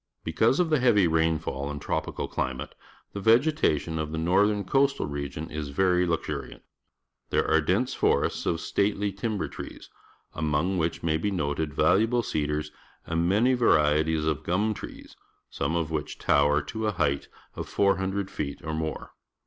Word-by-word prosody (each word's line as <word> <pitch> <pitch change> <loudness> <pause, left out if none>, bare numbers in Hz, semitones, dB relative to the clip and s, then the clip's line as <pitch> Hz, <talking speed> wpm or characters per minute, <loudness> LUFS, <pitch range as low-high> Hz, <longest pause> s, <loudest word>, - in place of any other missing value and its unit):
Because 110 - +2
of 170 -3 +1
the 155 - +4
heavy 110 -7 +4
rainfall 80 -4 0
and 75 0 -5
tropi - - -3
cal - - -2
climate, 65 0 -3 0.4
thg^ 100 - -3
vegetation 110 - +2
of 75 -1 -3
the 80 - -3
northern 100 +5 +2
coastal 135 +6 +2
region 70 +2 -5
i^ 75 -1 -5
very 90 +3 +2
lux 85 -1 -1
urian - - -5
t. - - -28 0.7
There - - +1
are 80 0 +4
d 75 - 0
ense 125 +5 -1
fores - - +2
ts - - -5
of 80 - 0
stately 100 0 0
timber 105 +1 -3
trees, - - -9 0.4
among 75 +5 0
which 80 0 -2
may 80 -1 +1
be 105 +6 -1
noted 75 -4 -2
valuable 115 +6 +3
cedars 75 -3 -2 0.3
and 85 +1 0
many 115 +7 +3
varieties 80 -8 +3
of 80 -1 0
gu 85 - -2
m 105 +4 +1
tre - - -9
es, - - -17 0.4
some 70 +4 -2
of 80 -2 -1
which 75 -2 -3
tower 75 +1 +3
to 110 +8 -3
a 105 - 0
height 70 -6 0 0.3
of - - -6
400 100 0 0
feet 70 -2 -4
or 80 - -4
more. 80 0 -4
85 Hz, 180 wpm, -27 LUFS, 75-105 Hz, 0.7 s, the